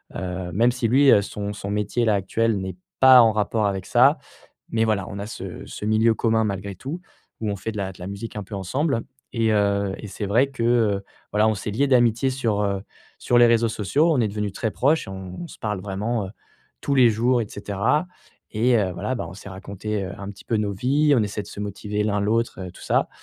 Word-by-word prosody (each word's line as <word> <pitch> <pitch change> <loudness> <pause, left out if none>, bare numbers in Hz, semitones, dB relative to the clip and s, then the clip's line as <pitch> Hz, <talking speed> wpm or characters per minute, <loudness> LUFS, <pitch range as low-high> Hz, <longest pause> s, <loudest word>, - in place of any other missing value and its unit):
heu, 90 0 -4
même 120 +5 +3
si 120 -2 -1
lui, 135 +4 +5
heu, 100 - +6
son 100 0 -5
son 100 -1 -6
métier-là, 105 +2 +1
actuel, 105 +3 0
n'est 95 -1 -5 0.2
pas 130 -2 +9
en 115 -1 +5
rapport 110 0 0
avec 95 -2 -2
ça - - +5 0.5
mais 115 0 +2
voilà, 105 -3 0
on 100 - -7
a 100 - -5
ce - - -7
ce - - -8
milieu 110 +1 +3
commun 110 0 +1
malgré 100 -1 -3
tout 150 - -6 0.4
où 110 - -1
on 100 - -2
fait 110 +4 -5
de 105 - -9
la 95 -1 -3
de - - -17
la 90 - -6
musique 100 +4 -7
un 105 - -3
peu 100 - -9
ensemble 125 - -1 0.3
et 115 -1 +1
heu 100 -2 +1
et 105 - -7
c'est 100 +1 -5
vrai 120 +7 +3
que, 135 -4 -5
heu, 110 -5 +2 0.3
voilà, 105 +1 +3
on 110 - +2
s'est 105 +2 -4
lié 135 +7 +2
d'amitié 120 0 +3
sur, 115 -6 0
heu, 100 -1 -1 0.4
sur 120 - +1
les 120 - +8
réseaux 115 0 +3
sociaux. 140 - +1
On 130 - +2
est 110 - +1
devenu 105 -1 -3
très 110 +2 -2
proches 145 +8 +1
et - - -8
on 95 - -7
se - - -13
parle 105 -4 -3
vraiment, 105 +2 -2
heu, - - -9 0.5
tous 140 - -1
les 125 -4 +6
jours 120 +3 +2
et 105 - -7
cetera 105 - -1 0.5
et 120 +3 +3
heu, 95 -3 0
voilà, 105 +9 -2
bah, 120 - -4
on 90 - -9
s'est 100 - -10
raconté, 100 +2 -4
heu, 95 - -6
un 100 - -6
petit 100 - -14
peu 115 - +1
nos 105 -1 -1
vies. 140 +8 +2
On 115 - +3
essaie 105 0 -3
de 100 - -14
se 100 - -8
motiver 105 +1 -3
l'un, 105 -1 0
l'autre, 105 -3 -1
tout - - -14
ça, - - +1
105 Hz, 240 wpm, -23 LUFS, 100-115 Hz, 0.5 s, pas